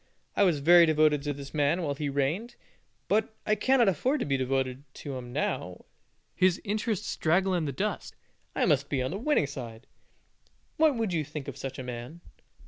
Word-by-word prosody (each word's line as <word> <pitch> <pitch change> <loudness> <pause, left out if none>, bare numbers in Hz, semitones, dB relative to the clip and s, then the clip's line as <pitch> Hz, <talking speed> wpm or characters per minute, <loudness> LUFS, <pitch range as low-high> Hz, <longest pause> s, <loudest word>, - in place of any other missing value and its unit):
I - - +1
was 175 -7 +3
very 170 +3 +7
devoted 155 -2 +3
to 145 0 -2
this 140 -1 -8
man 155 +4 +1
while 145 -3 -1
he 145 +1 -3
reigned, 155 - -1 0.5
but 220 +1 +1
I 215 - +2
cannot 255 +1 +3
afford 250 - +1
to - - 0
be 140 - 0
devoted 130 0 -1
to 140 -2 -6
him 125 -1 -7
now - - -3 0.5
his 185 -1 +2
interests 210 -1 -2
draggle 185 +4 +2
in 175 -3 0
the 140 - -2
dust; 130 - -3 0.4
I - - +2
must 140 -1 +2
be 130 -3 0
on 130 - -2
the 195 - -4
winning 295 - +2
side." 125 -4 -8 0.9
What 310 -3 +4
would 225 -5 -1
you 160 -2 0
think 150 -1 -7
of 140 - -6
such 135 -1 -6
a 130 - -5
man? 125 +6 -7
150 Hz, 195 wpm, -28 LUFS, 135-195 Hz, 0.9 s, very